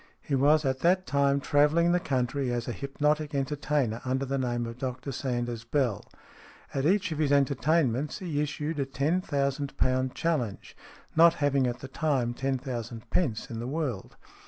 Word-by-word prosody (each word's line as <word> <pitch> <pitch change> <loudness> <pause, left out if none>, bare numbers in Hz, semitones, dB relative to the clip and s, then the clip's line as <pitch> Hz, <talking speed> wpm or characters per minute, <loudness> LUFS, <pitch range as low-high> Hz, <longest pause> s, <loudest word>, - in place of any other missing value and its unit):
He 145 - -6
was 145 +3 +4
at 130 0 0
that 185 +4 +3
time 140 0 +2
travelling 150 +5 +3
the 180 - +3
country 135 -3 -1
as 120 -1 -2
a - - -1
hypnotic 150 +3 -1
entertainer, 140 -4 -1
under 130 +1 -1
the 135 +1 -1
name 120 -2 -1
of 115 +1 -7
Dr 130 +1 -4
Sanders 120 -3 -3
Bell. 120 -4 0 0.7
At 135 +2 +1
each 190 -1 +2
of 155 - -3
his 150 -3 +2
entertainments 140 0 +2
he 165 -7 -2
issued 150 +1 -3
a 140 - +1
Ten 145 +7 0
Thousand 140 -3 -2
Pound 130 0 +1
Challenge, 140 -12 -2 0.4
not 165 +1 +7
having 140 -3 +2
at 120 0 -4
the 135 - -6
time 135 -5 0
ten 135 +2 -1
thousand 120 -3 -6
pence 120 -12 0
in 115 - -4
the 120 - -4
world. 135 -8 -3
140 Hz, 175 wpm, -28 LUFS, 125-150 Hz, 0.7 s, not